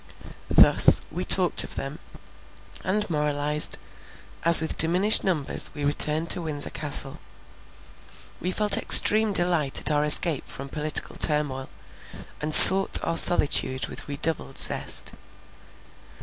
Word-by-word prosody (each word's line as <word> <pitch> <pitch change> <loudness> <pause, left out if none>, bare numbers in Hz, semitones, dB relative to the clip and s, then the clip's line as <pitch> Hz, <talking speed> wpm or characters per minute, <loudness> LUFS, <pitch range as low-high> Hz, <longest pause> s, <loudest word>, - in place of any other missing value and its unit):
Thus, - - +3
we - - -8
talked - - +2
of - - -11
them, - - -9 0.8
and 210 +3 -6
moralized, 150 -1 -4 0.7
as 170 0 +6
with 160 - -5
diminished 180 +6 +1
numbers 160 -7 -2
we 145 -1 -8
returned 150 +3 -2
to 180 - +2
Windsor 150 -3 -7
Castle. 140 -1 -3 1.2
We 180 - -7
felt 205 +2 -1
extreme 215 0 +2
delight 175 -7 -1
at - - 0
our 150 0 -3
escape 150 0 +1
from 135 +1 -9
political 150 +1 -3
turmoil, 145 -4 -1 0.7
and 150 +1 -7
sought 190 +5 +8
our 165 - -6
solitude 140 -6 +1
with - - -12
redoubled 145 -1 -5
zest. - - 0
155 Hz, 120 wpm, -20 LUFS, 145-175 Hz, 1.2 s, sought